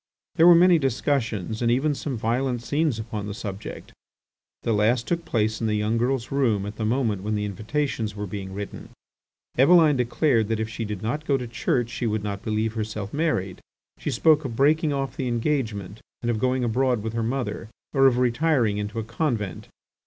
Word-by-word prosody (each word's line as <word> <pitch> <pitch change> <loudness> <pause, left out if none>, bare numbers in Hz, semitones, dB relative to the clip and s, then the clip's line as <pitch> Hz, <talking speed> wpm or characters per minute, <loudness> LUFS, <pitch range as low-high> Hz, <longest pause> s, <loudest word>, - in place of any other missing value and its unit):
There 165 - +5
were 175 - +9
many 175 0 +6
discussions 120 - -1
and 120 - +2
even 135 +5 +2
some 135 -1 -4
violent 120 +2 -1
scenes 145 -2 0
upon 110 -2 -5
the 100 - -5
subject. 100 -1 -7 0.7
The 115 - +1
last 115 +3 +2
took 170 -1 -1
place 110 -1 0
in 115 - 0
the 105 - +1
young 105 +2 0
girl's 125 0 -1
room 115 -8 +1
at 105 +1 -7
the 110 - -2
moment 110 -4 0
when 105 +2 -2
the 105 0 -1
invitations 110 +1 -2
were 105 0 -4
being 95 0 -6
written. 100 +1 -7 0.7
Eveline 155 0 +6
declared 125 -2 +2
that 110 0 -1
if 110 - -1
she 110 +1 -5
did 105 -2 -5
not 150 +7 -3
go 140 - +3
to 125 - -5
church 120 0 -1
she 120 - -2
would 110 -1 -1
not 100 -1 -4
believe 110 0 -1
herself 105 -2 -4
married. 145 - -1 0.4
She - - -3
spoke 155 -1 +4
of 125 -5 -4
breaking 150 +4 +3
off 135 -1 -2
the 130 - -2
engagement, 115 -5 -2 0.2
and 120 - +1
of 110 - -2
going 130 +1 +1
abroad 125 -1 +1
with 110 0 -3
her 115 - -1
mother, 120 -1 -3 0.2
or 135 -1 +6
of 125 -2 +3
retiring 125 -3 +2
into 105 +2 -4
a 115 - -1
convent. 110 - -2
115 Hz, 195 wpm, -25 LUFS, 105-135 Hz, 0.7 s, were